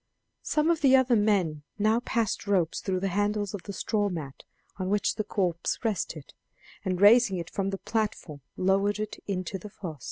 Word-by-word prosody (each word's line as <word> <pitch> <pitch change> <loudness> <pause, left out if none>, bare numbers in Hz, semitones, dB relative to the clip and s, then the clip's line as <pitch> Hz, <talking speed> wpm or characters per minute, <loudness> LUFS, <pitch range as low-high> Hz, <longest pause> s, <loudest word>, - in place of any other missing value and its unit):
Some 305 +2 +1
of 330 - 0
the 270 -2 +6
other 260 -2 +4
men 195 -8 +2 0.2
now 215 +2 +3
passed 230 -4 -1
ropes 180 -5 +1
through 185 -2 -1
the 195 - 0
handles 205 0 0
of 205 - -5
the 200 - -7
straw 205 +1 0
mat 150 -7 -6 0.3
on 185 -1 -2
which 205 +1 +1
the 215 - -2
corpse 180 -5 -1
rested, 170 -8 -3 0.5
and 185 -2 -1
raising 205 -1 +6
it 170 -1 -6
from 195 -1 -1
the 195 - -3
platform 205 -10 -3 0.2
lowered 195 +2 +2
it 215 0 -5
into 190 -1 -3
the 210 - -9
foss. 175 -7 -8
200 Hz, 185 wpm, -28 LUFS, 185-215 Hz, 0.5 s, the